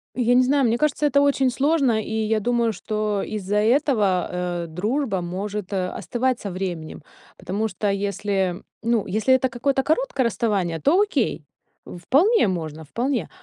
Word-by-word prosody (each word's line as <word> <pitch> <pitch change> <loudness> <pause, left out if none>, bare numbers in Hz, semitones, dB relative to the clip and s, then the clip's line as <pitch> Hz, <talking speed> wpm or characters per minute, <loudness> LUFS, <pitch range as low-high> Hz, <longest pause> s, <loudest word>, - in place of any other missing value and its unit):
Я 245 -1 +2
не 250 +1 +5
знаю, 275 +1 +2
мне 230 +1 +2
кажется, 300 +2 +1
это 280 -1 +3
очень 275 -2 +3
сложно, 270 -5 +2
и - - -8
я 220 0 0
думаю, 235 0 +1
что 210 -1 -2
из-за 205 -1 -2
этого, 215 -5 +2 0.4
э, - - -5
дружба 210 - -1
может 195 +3 -5
остывать 240 +7 -1
со 200 - -5
временем, 175 -5 -5 0.3
потому 195 +5 -2
что 205 +1 -2
если 195 -2 -1 0.2
ну, 230 -2 +1
если 220 +6 +2
это 260 0 +2
какое-то 265 +2 0
короткое 315 - 0
расставание, 200 -8 0
то 320 +7 +3
окей, 275 - 0 0.4
вполне 280 - +2
можно, 160 -4 -4
вполне. 245 - -2
220 Hz, 150 wpm, -23 LUFS, 195-260 Hz, 0.4 s, не